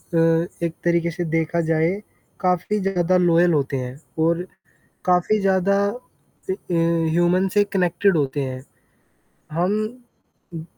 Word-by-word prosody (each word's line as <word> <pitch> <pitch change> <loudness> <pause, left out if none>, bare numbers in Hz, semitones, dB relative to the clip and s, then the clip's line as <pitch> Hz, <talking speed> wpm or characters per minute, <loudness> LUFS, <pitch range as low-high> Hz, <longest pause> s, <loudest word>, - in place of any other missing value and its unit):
अ, 165 +1 +3 0.2
एक 165 - -3
तरीके 170 0 +1
से 175 +1 -4
देखा 165 +1 0
जाए, 160 0 +2 0.5
काफ़ी 185 +3 0
ज़्यादा 185 -2 +1
लॉयल 175 0 +4
होते 140 -2 0
हैं 125 0 -5 0.3
और 170 +2 +1 0.6
काफ़ी 180 +4 +2
ज़्यादा 195 0 +2
अ 245 -4 -10
अ, - - -4 0.2
ह्यूमन 170 +2 +2
से 205 - +4
कनेक्टेड 195 -2 +1
होते 145 0 -1
हैं। 130 -1 -5 0.9
हम 180 +4 +1 0.8
उ 160 - -6
170 Hz, 130 wpm, -22 LUFS, 165-185 Hz, 0.9 s, लॉयल